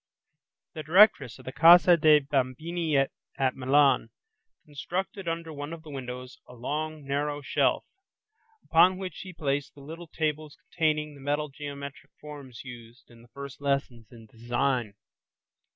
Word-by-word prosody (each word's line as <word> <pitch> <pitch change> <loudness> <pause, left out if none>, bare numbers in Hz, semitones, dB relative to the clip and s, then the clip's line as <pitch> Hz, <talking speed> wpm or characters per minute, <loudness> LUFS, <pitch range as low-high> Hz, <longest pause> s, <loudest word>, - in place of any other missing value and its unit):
The 155 - -6
Directress 155 - +4
of - - -16
the 130 - -5
Casa 170 +4 +7
dei 155 -2 +5
Bambini 145 +4 -1
at 135 -1 -2
Milan 135 +2 +3 0.6
constructed 180 +6 -5
under 165 -1 -4
one 145 +2 -6
of 165 -1 -9
the 155 - -11
windows 125 -1 -7
a 125 - -13
long, 150 +4 -4
narrow 145 +1 -2
shelf - - +1 0.8
upon 180 +3 +4
which 185 -1 -5
she 185 - -9
placed 145 -4 -3
the 140 - -14
little 165 +4 -9
tables 155 -1 -3
containing 150 -2 -1
the 140 - -14
metal 145 +2 -1
geometric 140 0 -8
forms 140 -5 -10
used 120 -1 -13
in 115 -1 -17
the 120 - -18
first 140 +3 -10
lessons 135 -5 -2
in 115 -2 -14
design. 120 0 -2
145 Hz, 145 wpm, -27 LUFS, 130-155 Hz, 0.8 s, Casa